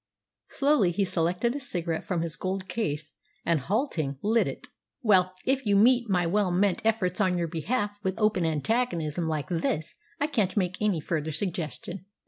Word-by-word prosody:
Slowly 275 -9 +3
he 195 +3 +1
selected 180 +6 0
a - - -2
cigarette 170 - -3
from 175 -3 -1
his 165 -2 -3
gold 190 0 -3
case, 155 -7 -3 0.3
and, 170 -2 +3
halting, 165 - -1
lit 225 +2 +3
it. - - -6 0.4
"Well, 185 -4 +4
if 265 +1 +1
you 205 -3 +2
meet 240 +3 +5
my 180 -3 +2
well 195 +3 +2
meant 185 +1 +2
efforts 210 -4 +1
on 185 -3 +2
your 170 -1 0
behalf 205 +7 -1
with 190 -2 -2
open 215 -4 +2
antagonism 165 - 0
like 155 +1 -2
this 165 -2 -1 0.3
I 290 - +2
can't 215 -10 0
make 185 0 0
any 205 -7 +1
further 160 0 -2
suggestion." 180 +3 -4
185 Hz, 170 wpm, -27 LUFS, 165-215 Hz, 0.4 s, meet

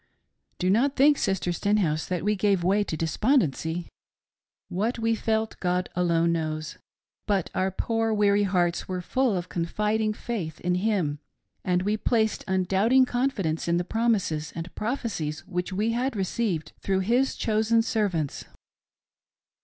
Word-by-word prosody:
"Do 185 +1 +1
not 270 +7 +2
think, 285 +2 +5
Sister 190 -2 0
Stenhouse, 175 -4 0
that 180 -2 -2
we 210 +1 +2
gave 195 -3 +1
way 200 +4 +3
to 160 - -4
despondency. 165 - 0 0.8
What 215 +7 -1
we 230 0 +1
felt, 220 0 -1
God 180 0 0
alone 170 -1 +2
knows; 155 -2 -3 0.5
but 195 -4 0
our 190 +1 +1
poor 225 +3 -1
weary 205 -1 +3
hearts 180 -3 +1
were 185 -1 -3
full 250 +1 +1
of 175 0 -4
confiding 210 +6 -1
faith 205 -9 -5
in 180 0 0
Him, 180 -7 0 0.4
and 180 0 +1
we 210 +2 0
placed 220 -1 +1
undoubting 195 +7 +3
confidence 245 -12 -1
in 170 0 +2
the 175 - 0
promises 195 -8 0
and 170 +1 -6
prophecies 210 - -3
which 180 0 -3
we 210 +4 0
had 245 +2 -1
received 190 -5 -2
through 190 -1 0
His 245 +7 +1
chosen 220 +1 +2
servants. 195 -11 -1
195 Hz, 145 wpm, -26 LUFS, 175-225 Hz, 0.8 s, think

